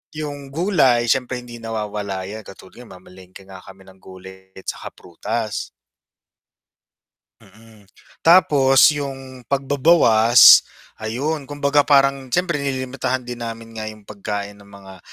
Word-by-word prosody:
yung 145 -2 -7
gulay 135 -8 +1
siyempre 125 -1 -2
hindi 120 -1 -11
nawawala 105 -4 -5
'yan 110 +2 -8
katulad 95 +2 -15
yan - - -17
mamalengke 95 +1 -15
nga 95 -1 -12
kami 95 0 -15
ng 95 0 -18
gulay 95 0 -15
tsaka - - -7
prutas. 110 +5 -5 1.7
Mm. 110 -2 -20 0.3
Tapos 145 -6 +5
yung 135 -4 -8
pagbabawas 135 -4 +5 0.4
ayun, 135 +7 -4
kumbaga 145 0 0
parang 135 -2 +2
siyempre 170 +3 -1
nililimitahan 130 -1 -3
din 120 0 -8
namin 115 -1 -8
nga 110 - -5
yung 110 -1 -11
pagkain 100 0 -7
ng 100 - -18
mga 100 -1 -14
120 Hz, 125 wpm, -20 LUFS, 100-140 Hz, 1.7 s, Tapos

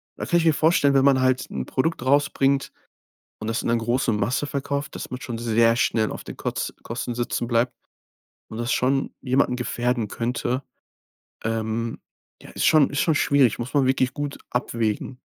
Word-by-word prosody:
Da - - -5
kann 175 - +2
ich 165 - 0
mir 160 - +5
vorstellen, 150 -2 +3
wenn 135 0 +4
man 135 -2 +5
halt 130 0 +1
'n 65 -1 -3
Produkt 145 0 -1
rausbringt 140 0 +2 0.7
und 110 - -5
das 115 - -1
in - - -2
'ne 115 - +3
große 120 +1 0
Masse 105 +7 0
verkauft, 140 0 -3
dass - - -6
man 125 - -4
schon 120 -3 -5
sehr 115 0 +3
schnell 110 -2 +1
auf - - -7
den - - -9
Koz - - -3
Kosten 120 +1 -4
sitzen 120 0 -2
bleibt 120 +1 +1 0.8
und 110 - -7
das 120 +1 -1
schon 135 +2 +1
jemanden 130 0 +1
gefährden 120 -2 -1
könnte, 125 +3 -2 0.8
ähm. 115 +1 -2 0.4
Ja, - - -12
ist - - -1
schon 155 -3 +5
ist 145 - -2
schon 160 - +3
schwierig, 140 -7 +3
muss 120 +5 -5
man 140 -2 +4
wirklich 130 0 +1
gut 145 -1 -4
abwägen. 120 0 -2
125 Hz, 185 wpm, -24 LUFS, 115-140 Hz, 0.8 s, mir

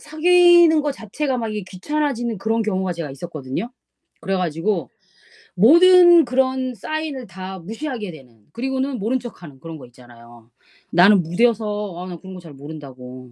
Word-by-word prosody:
사귀는 345 0 +5
거 295 -1 -1
자체가 265 +3 -4
막 225 -1 -3
이게 210 -2 -5
귀찮아지는 240 +2 -3
그런 225 +3 -1
경우가 190 -3 -2
제가 165 -4 -6
있었거든요. 145 - -6 0.5
그래 195 0 -2
가지고 175 +2 -2 0.7
모든 345 - +7
그런 260 +1 0
sign을 285 +3 -5
다 190 +1 -8
무시하게 225 - -6
되는. 125 -8 -16
그리고는 265 +1 -3
모른 230 +6 -1
척하는 175 - -11
그런 165 +2 -9
거 - - -11
있잖아요. 120 -1 -18 0.4
"나는 180 +2 +5
무뎌서 210 +1 -1
아 180 +1 -7
나 180 -2 -7
그런 190 +2 -11
거 - - -9
잘 165 -4 -13
모른다."고. 130 -4 -11
205 Hz, 355 characters per minute, -20 LUFS, 165-260 Hz, 0.7 s, 모든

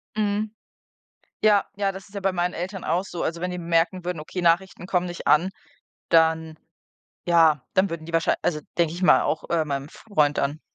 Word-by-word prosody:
Mhm. 210 0 0 0.9
Ja, 210 -2 +5
ja, 200 -1 0
das 190 0 -10
ist 205 - -17
ja 200 - -2
bei 195 - +1
meinen 180 0 -1
Eltern 185 +2 -5
auch 175 +4 0
so. 175 -3 -5
Also, 170 +1 -3
wenn 180 0 -2
die 180 - -4
merken 170 +2 +1
würden: 180 -3 -3
Okay, 180 +4 -5
Nachrichten 175 +1 +1
kommen 180 -1 +1
nicht 175 -1 -6
an. 165 +5 +4 0.6
Dann 160 -1 +2 0.7
ja, 160 -5 +5
dann 190 +1 +3
würden 165 -1 -6
die 170 - -9
wahrschei 165 0 +2
also, 150 -3 0 0.2
denke 170 -1 +2
ich 180 - -6
mal 180 - +6
auch, 155 - -2
äh, 165 -2 +2
meinem 140 -1 -3
Freund 150 -7 0
dann 145 +3 -1
175 Hz, 200 wpm, -24 LUFS, 160-190 Hz, 0.9 s, mal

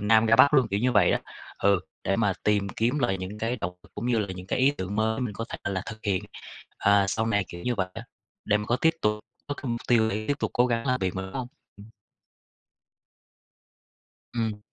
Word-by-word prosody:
Nam 110 +2 +4
ra 115 +1 +5
Bắc 140 +3 +7
luôn, 130 -5 +4
kiểu 100 +1 0
như 125 0 +2
vậy 100 -5 +5
đó. - - +2 0.4
Ừ, 100 -2 +3 0.2
để - - +1
mà - - +2
tìm 105 -2 +2
kiếm 120 +8 0
lại 95 -8 +1
những 95 +3 -6
cái 115 +3 -1
động 90 +1 -4
lực - - -22
cũng 110 +4 -4
như 120 -2 +2
là 105 - 0
những 90 0 -9
cái - - -1
ý 135 +2 +5
tưởng 100 -6 -5
mới 110 +2 +1
mình 115 -5 -3
có 115 - -4
thể - - -6
là 95 -1 -1
thực 110 0 -7
hiện, 95 -3 0 0.5
à, 100 -1 +4
sau 110 +2 0
này, 100 -3 +1
kiểu 85 0 -8
như 125 - 0
vậy 95 -3 -1
á, 115 - -6 0.4
để 105 - +3
mà 105 - -3
có 120 - +2
tiếp 160 +5 +3
tục 105 0 +2 0.3
có 145 - -3
cái - - -12
mục 115 - -2
tiêu 110 -2 +4
để 110 +1 -2
tiếp 145 - +3
tục - - -1
cố 125 - +4
gắng 115 0 -1
làm 125 0 +1
việc 95 -1 -1
mà, 95 - -3
đúng 95 0 -8
hông? 125 -2 -3 0.3
Ừm. 100 +1 -13 2.5
Ừm. 110 -3 -1
110 Hz, 245 wpm, -27 LUFS, 100-120 Hz, 2.5 s, Bắc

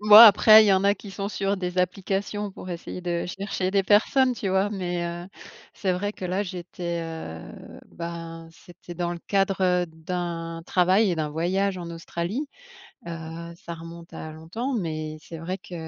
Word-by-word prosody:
Moi, 210 +2 +11
après, 215 +1 +9
il 215 - +3
y 200 - +5
en 190 +1 +2
a 200 0 +5
qui 205 - -11
sont 195 +1 -3
sur 195 +1 0
des 180 -1 -3
applications 195 +2 -1
pour 185 - -10
essayer 175 +1 -6
de 175 -1 -1
chercher 190 0 -2
des 195 0 +3
personnes, 250 +6 +4
tu 205 - -3
vois 190 +2 +2
mais 180 -3 -2
heu, 175 +1 -5 0.5
c'est 190 -2 -1
vrai 205 +3 -2
que, 190 - -8
là, 185 +3 0
j'étais, 175 -2 -4
heu, 160 - -6 0.5
ben, 165 -1 -6
c'était 175 +1 -13
dans 175 0 -1
le 175 - -6
cadre, 195 -1 +2 0.3
heu, - - -11
d'un 165 0 -4
travail 190 +3 +4
et 175 - -1
d'un 155 -1 -1
voyage 185 +5 0
en 170 -1 -6
Australie. 170 - -3 0.6
Heu, 165 0 -6
ça 175 -3 -7
remonte 165 +1 -11
à 155 - -6
longtemps 180 - -4
mais 155 -7 -3
c'est 165 +2 -9
vrai 175 +4 -4
que, 185 - -13
180 Hz, 185 wpm, -25 LUFS, 170-195 Hz, 0.6 s, Moi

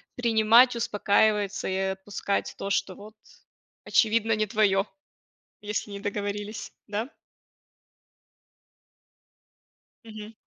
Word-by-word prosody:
принимать, 235 +1 +5
успокаивается 210 -2 +1
и 190 - -1
отпускать 190 +1 -2
то, 195 - -4
что 195 -1 -1
вот 210 +2 -13 0.7
очевидно 225 0 +2
не 215 - 0
твоё, 205 -2 +2 0.8
если 210 0 -4
не 200 - -6
договорились, 205 +1 -4 0.2
да? 215 +6 -4 2.9
Мгм. 215 -1 -10
210 Hz, 85 wpm, -26 LUFS, 200-220 Hz, 2.9 s, принимать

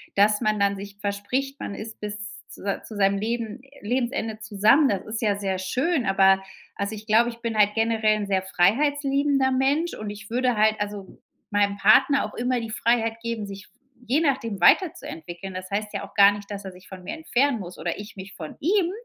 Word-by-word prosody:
dass 210 +1 +4
man 215 -1 0
dann 200 0 +2
sich 200 0 -9
verspricht, 210 +8 -2
man 200 - -5
ist 220 +1 -8
bis 210 0 -5
z 210 - -5 0.2
zu 195 -1 -4
zu 220 - -10
seinem 200 0 +2
Leben 230 +1 -3 0.2
Lebensende 235 -1 -2
zusammen, 215 +7 +4
das 195 -2 -2
ist 220 +2 -4
ja 205 -3 +2
sehr 190 -2 -2
schön. 260 - 0
Aber, 195 0 +4 0.3
also, 200 +2 -3
ich 215 +1 -10
glaube, 230 +3 +4
ich 230 - -10
bin 230 -2 -3
halt 205 0 +5
generell 220 -2 +2
sehr 190 -1 +1
freiheitsliebender 275 +7 +2
Mensch 280 +6 +1
und 215 -1 -6
ich 205 0 -9
würde 250 0 +1
halt 215 +1 +3
also 205 -2 -6 0.3
meinem 200 0 +1
Partner 265 +8 +5
auch 210 - -8
immer 245 0 0
die 225 - -6
Freiheit 230 0 0
geben, 230 -3 -3
sich 195 -1 -9 0.4
je 285 +6 +2
nachdem 230 - -1
weiterzuentwickeln. 190 - +1
Das 185 0 -7
heißt 210 +1 -2
ja - - -4
auch - - -23
gar 200 0 +7
nicht, 205 0 -8
dass 200 -1 -6
er 190 - -7
sich 180 0 -16
von 185 -1 -10
mir 180 - -5
entfernen 280 -5 +1
muss 180 -1 -8
oder 170 +4 -3
ich 210 +1 -9
mich 190 +1 -9
von 155 -3 -8
ihm. 360 +2 +2
215 Hz, 205 wpm, -24 LUFS, 200-245 Hz, 0.4 s, gar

